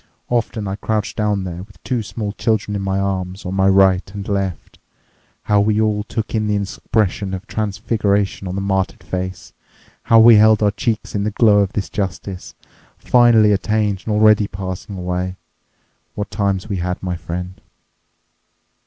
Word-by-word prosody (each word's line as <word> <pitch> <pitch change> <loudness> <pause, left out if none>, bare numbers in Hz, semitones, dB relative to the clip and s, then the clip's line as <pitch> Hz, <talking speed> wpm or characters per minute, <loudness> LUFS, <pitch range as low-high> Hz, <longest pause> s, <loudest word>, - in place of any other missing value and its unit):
Often 115 -3 -1
I 95 +1 -3
crouched 105 -1 -2
down 105 -2 0
there 90 -1 -6
with 100 -1 -14
two 125 -3 -1
small 105 0 -5
children 105 -1 -1
in 100 - -2
my 95 0 -1
arms, 95 0 -3
on 90 - -3
my 95 0 +2
right 95 -1 +5
and 100 0 -6
left. 95 -5 -3 0.6
How 105 -1 +3
we 105 +1 +1
all 105 -1 +1
took 110 +1 -4
in 110 -1 0
the 105 - +1
expression 100 -1 -1
of 95 +3 -8
transfiguration 100 -2 -1
on 90 - -4
the 100 - -2
martyred 95 -1 -1
face! 95 -1 -5 0.5
How 115 - +5
we 115 0 +8
held 110 0 +5
our 105 - +3
cheeks 110 +2 -2
in 100 - -1
the 105 - 0
glow 105 -1 +4
of 100 0 0
this 100 - -2
justice, 95 -1 -5 0.4
finally 120 -4 +5
attained 105 -1 0
and 105 - 0
already 105 -1 +5
passing 95 +1 -6
away! 90 +1 -3 0.8
What 105 - -4
times 100 -2 -1
we 100 -3 -2
had, 90 +1 -3
my 90 -1 -2
friend!" 90 +2 -6
100 Hz, 170 wpm, -19 LUFS, 95-105 Hz, 0.8 s, we